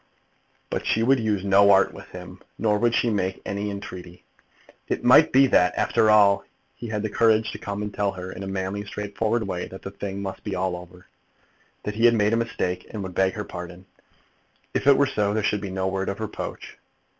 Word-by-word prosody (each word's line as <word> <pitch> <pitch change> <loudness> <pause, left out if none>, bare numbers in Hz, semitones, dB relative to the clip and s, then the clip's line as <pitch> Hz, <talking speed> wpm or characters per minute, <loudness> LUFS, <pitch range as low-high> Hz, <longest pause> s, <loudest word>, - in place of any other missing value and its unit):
But - - -3
she 115 - +2
would 135 +2 +4
use 105 -4 -1
no 100 +1 +5
art 95 -1 +5
with - - -11
him; - - -11 0.2
nor 105 -2 +1
would 120 +1 +2
she 120 - +2
make 95 -2 -1
any 100 +1 -3
entreaty. 90 -3 -8 0.6
It - - -2
might - - +6
be 135 +1 +6
that, 90 -8 +3
after 110 - +2
all, 100 -2 +5 0.3
he 120 - -8
had 105 -1 -3
the 110 - -1
courage 110 0 +3
to - - -8
come 100 0 -4
and 105 -1 -5
tell 100 -1 0
her, 90 0 -7
in 95 - -8
a 95 - -5
manly, 95 +1 -3
straightforward 105 +2 -2
way, 90 -2 -3
that 95 - -11
the 95 - -6
thing 100 0 -6
must 95 -1 -6
be - - -3
all 95 0 -1
over, 90 0 -12 0.8
that 105 - -3
he 115 +2 +1
had 120 0 +6
made 105 0 +2
a - - +3
mistake, 90 -6 -2
and 105 -3 -5
would 95 -1 -6
beg 95 +1 +2
her 105 - -4
pardon. 90 +1 -9 0.9
If - - -1
it 140 - +7
were 140 - +4
so, 105 -6 0
there 110 - 0
should 105 0 0
be 100 - -5
no 95 0 -2
word 95 0 -2
of 100 - -4
reproach. 110 -2 -6
100 Hz, 220 wpm, -24 LUFS, 95-110 Hz, 0.9 s, it